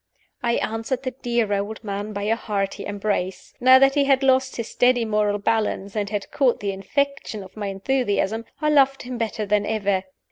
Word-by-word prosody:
I 235 -1 +1
answered 225 +4 -2
the 255 - -2
dear 235 -4 -1
old 205 +3 -3
man 205 0 -4
by 200 -1 -4
a 220 +2 +2
hearty 200 -4 -3
embrace. 200 -2 -3
Now 255 +1 +8
that 270 +1 +5
he 285 -1 +2
had 270 -1 +3
lost 260 0 +3
his 230 -2 -4
steady 245 -1 +2
moral 210 -1 +1
balance, 205 -2 -1
and 205 -2 -1
had 205 -1 -4
caught 265 -4 +2
the 200 -1 -2
infection 250 +2 -2
of 190 - -14
my 210 -2 -4
enthusiasm, 220 +1 -1
I 305 - +1
loved 275 -2 +4
him 250 -1 -6
better 220 -1 -2
than 205 0 +2
ever. 200 -3 0
220 Hz, 190 wpm, -23 LUFS, 205-255 Hz, -, Now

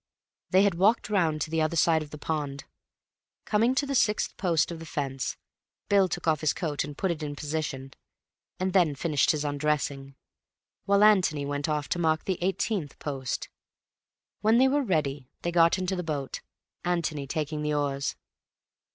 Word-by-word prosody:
They 190 +1 +5
had 200 -2 +3
walked 210 +2 +3
round 165 -6 +1
to 155 - -2
the 160 -1 +1
other 155 +1 0
side 160 0 +3
of 150 - -7
the 150 - -8
pond. 145 -2 -3 0.8
Coming 230 +4 +2
to 285 - +1
the 280 - -3
sixth 210 -5 +1
post 170 -4 +1
of 165 - -6
the 165 - -8
fence, 135 -4 -3 0.5
Bill 200 -2 +5
took 165 - -4
off 155 -2 +2
his 155 -1 +2
coat 150 -4 -2
and 145 0 -8
put 190 -3 0
it 165 -2 -4
in 145 -1 -4
position, 145 -3 -4 0.7
and 185 0 -1
then 170 -7 +3
finished 150 0 +1
his 150 -1 +1
undressing, 145 -2 -1 0.7
while 200 +1 +4
Antony 180 -9 +4
went 145 +1 -2
off 150 -1 -1
to 175 - -1
mark 160 -2 +1
the 190 -3 -1
eighteenth 185 - -1
post. 135 -3 -4 0.9
When 220 +2 +4
they 260 +2 +6
were 285 +2 +2
ready, 145 - -1
they 175 - -1
got 170 +1 +4
into 185 0 -1
the 180 - -2
boat, 150 -5 -4 0.4
Antony 165 -5 -1
taking 150 +1 -2
the 150 0 0
oars. 140 -1 -1
155 Hz, 175 wpm, -27 LUFS, 145-185 Hz, 0.9 s, they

